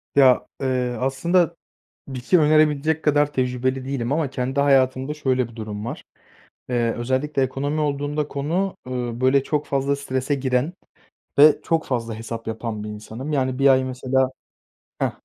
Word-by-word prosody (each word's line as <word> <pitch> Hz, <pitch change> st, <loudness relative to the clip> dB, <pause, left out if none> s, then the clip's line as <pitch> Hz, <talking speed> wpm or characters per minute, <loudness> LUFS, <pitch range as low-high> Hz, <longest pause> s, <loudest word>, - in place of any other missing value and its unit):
Ya, 130 Hz, -3 st, +5 dB
eee, 125 Hz, -2 st, 0 dB
aslında 170 Hz, +6 st, +1 dB, 0.5 s
bir 130 Hz, -2 st, -5 dB
şey 180 Hz, +8 st, +4 dB
önerebilecek 155 Hz, 0 st, +3 dB
kadar 145 Hz, -1 st, +3 dB
tecrübeli 130 Hz, 0 st, -1 dB
değilim 135 Hz, -1 st, -2 dB
ama 150 Hz, -3 st, 0 dB
kendi 130 Hz, +1 st, -1 dB
hayatımda 135 Hz, 0 st, +2 dB
şöyle 130 Hz, -5 st, 0 dB
bir 115 Hz, -, -16 dB
durum 105 Hz, -1 st, -6 dB
var, 120 Hz, -, -6 dB, 0.7 s
eee, 120 Hz, -2 st, +1 dB
özellikle 130 Hz, +4 st, -1 dB
ekonomi 140 Hz, +4 st, -1 dB
olduğunda 145 Hz, 0 st, -1 dB
konu, 165 Hz, +8 st, -2 dB
ııı, 125 Hz, -1 st, -4 dB
böyle, 130 Hz, +1 st, +4 dB
çok 150 Hz, 0 st, -1 dB
fazla 140 Hz, 0 st, 0 dB
strese 140 Hz, 0 st, -2 dB
giren 130 Hz, +4 st, 0 dB, 0.7 s
ve 150 Hz, 0 st, +7 dB
çok 165 Hz, -1 st, 0 dB
fazla 115 Hz, -3 st, -2 dB
hesap 115 Hz, +1 st, -7 dB
yapan 110 Hz, -1 st, -4 dB
bir -, -, -5 dB
insanım. 110 Hz, +7 st, -7 dB
Yani, 130 Hz, -2 st, 0 dB
1 140 Hz, 0 st, +5 dB
ay, 130 Hz, -1 st, +5 dB
mesela 130 Hz, 0 st, 0 dB, 0.7 s
Heh. -, -, +1 dB
130 Hz, 155 wpm, -23 LUFS, 125-145 Hz, 0.7 s, ve